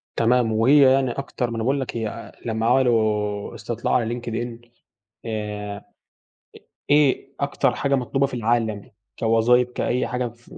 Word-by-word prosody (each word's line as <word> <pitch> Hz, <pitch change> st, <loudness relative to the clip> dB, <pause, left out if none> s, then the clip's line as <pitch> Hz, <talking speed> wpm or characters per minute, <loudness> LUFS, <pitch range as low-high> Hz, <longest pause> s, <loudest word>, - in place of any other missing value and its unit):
تمام 120 Hz, 0 st, +2 dB
وهي 130 Hz, +5 st, +5 dB
يعني 135 Hz, -2 st, +1 dB
أكتر 125 Hz, -1 st, -3 dB
ما 115 Hz, -, -5 dB
أنا 115 Hz, -, -2 dB
باقول 135 Hz, +3 st, +1 dB
لك 125 Hz, -, -4 dB
هي 115 Hz, 0 st, -5 dB
لمّا 110 Hz, -1 st, -1 dB
عملوا 110 Hz, -4 st, +1 dB
استطلاع 115 Hz, +1 st, -3 dB
على 120 Hz, -1 st, 0 dB
LinkedIn 120 Hz, 0 st, -6 dB, 0.6 s
آآ 105 Hz, -2 st, -4 dB
إ -, -, -12 dB, 1.1 s
إيه 140 Hz, -2 st, +3 dB
أكتر 140 Hz, -3 st, +1 dB
حاجة 140 Hz, +2 st, 0 dB
مطلوبة 135 Hz, +1 st, +1 dB
في 135 Hz, -, -8 dB
العالم 115 Hz, -2 st, -1 dB, 0.3 s
كوظايف 120 Hz, +2 st, +3 dB
كأي 125 Hz, 0 st, -1 dB
حاجة 125 Hz, 0 st, -2 dB
في 120 Hz, +1 st, -20 dB
120 Hz, 150 wpm, -23 LUFS, 110-125 Hz, 1.1 s, وهي